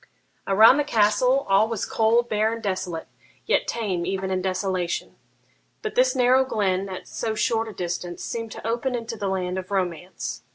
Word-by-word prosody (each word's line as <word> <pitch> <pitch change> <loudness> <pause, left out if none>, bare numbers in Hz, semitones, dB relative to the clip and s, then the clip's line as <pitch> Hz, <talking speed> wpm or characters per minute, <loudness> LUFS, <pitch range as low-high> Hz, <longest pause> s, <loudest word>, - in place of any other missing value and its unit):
Around 220 +7 +7
the 295 - +2
castle 250 +2 +2
all 195 +2 +4
was 225 -3 -2
cold, 230 +2 +2
bare, 215 0 +1
and 230 0 -7
desolate, 185 -4 -3 0.4
yet - - +1
tame 195 -7 -2
even 190 +1 -2
in 185 0 0
desolation; 185 -1 -2 0.7
but 435 - -3
this - - +3
narrow 255 +1 +4
glen, 195 -6 -1
at 185 - -7
so 220 -1 -3
short 225 -1 0
a - - -6
distance, 175 -1 -4
seemed 230 -1 -4
to - - -7
open 240 +3 -1
into 230 -1 -4
the 205 -2 -3
land 185 -1 -1
of 185 - -9
romance. 175 -10 -3
205 Hz, 175 wpm, -24 LUFS, 185-230 Hz, 0.7 s, Around